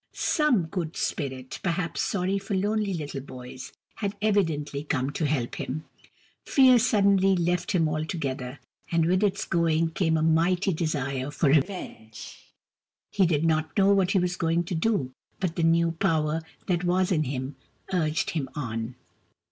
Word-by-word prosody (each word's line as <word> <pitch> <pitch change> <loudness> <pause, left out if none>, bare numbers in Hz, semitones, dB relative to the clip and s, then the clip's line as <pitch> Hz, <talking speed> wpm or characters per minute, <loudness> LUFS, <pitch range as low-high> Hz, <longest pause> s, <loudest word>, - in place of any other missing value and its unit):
Some 300 - +2
good 165 -1 -4
Spirit, 130 -4 -3
perhaps 175 -1 -1
sorry 195 0 0
for 195 0 -3
lonely 205 +1 0
little 145 -4 -5
boys, 130 -1 -9 0.3
had 200 -2 -3
evidently 165 -9 0
come 140 -2 -1
to 155 +1 -1
help 135 -5 -1
him. 155 +4 -4 0.6
Fear 255 -3 +6
suddenly 200 -4 +3
left 175 +3 0
him 165 -4 +3
altogether, 150 -5 -3 0.3
and 165 -1 +3
with 185 +3 +2
its 200 -1 0
going 165 -1 +1
came 160 -1 +1
a 155 - 0
mighty 175 +4 +2
desire 140 -5 -2
for 145 0 +1
revenge. 140 - -2 0.8
He 190 -3 +3
did 160 -1 +1
not 160 +2 0
know 200 0 +5
what 190 -2 +2
he 200 - +2
was 180 0 0
going 165 +1 +1
to 175 - -5
do, 160 - 0 0.3
but 180 -4 -2
the - - -1
new 165 0 +3
power 160 -1 0 0.2
that 175 -1 0
was 180 +1 +1
in 155 -4 +2
him 130 +1 -4 0.4
urged 155 -3 0
him 140 -5 -3
on. 115 -3 -4
165 Hz, 155 wpm, -26 LUFS, 150-185 Hz, 0.8 s, Fear